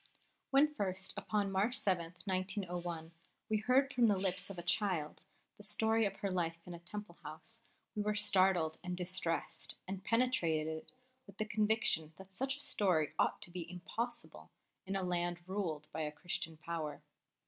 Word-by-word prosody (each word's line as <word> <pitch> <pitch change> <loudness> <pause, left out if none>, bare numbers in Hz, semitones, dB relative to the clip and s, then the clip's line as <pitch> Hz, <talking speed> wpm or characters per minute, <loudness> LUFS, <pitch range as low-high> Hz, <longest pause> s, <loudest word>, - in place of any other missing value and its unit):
WHEN 290 +2 +5
first, 190 -5 -1
upon 205 -2 0
March 205 +6 +3
7, 175 -3 +1
1901, 180 -4 -2 0.4
we 215 - +3
heard 260 +5 +3
from 245 -2 +5
the 205 -2 +4
lips 185 0 0
of 195 - -7
a - - -3
little 170 - -19
child 180 -6 +1 0.4
the 210 - -12
story 220 +1 +3
of - - -5
her 200 -2 -2
life 165 -2 0
in 180 - -7
a 170 - -7
Temple 180 +1 -6
house, 160 +9 -6 0.3
we 210 - 0
were 210 0 +1
startled 190 -6 +4
and 180 0 -3
distressed, 180 -2 -1
and 190 0 -4
penetrated 165 -11 +1 0.4
with 200 0 -14
the 215 - 0
conviction 215 -7 +2
that 190 0 -12
such 265 +6 0
a - - -9
story 180 - +2
ought - - +2
to 175 - -5
be 170 -2 -4
impossible 230 +7 -4 0.4
in 195 - 0
a 195 - 0
land 175 -1 0
ruled 175 -6 -2
by 160 - -3
a 150 -1 -1
Christian 160 +1 -2
Power. 155 -2 -4
185 Hz, 170 wpm, -36 LUFS, 170-210 Hz, 0.4 s, WHEN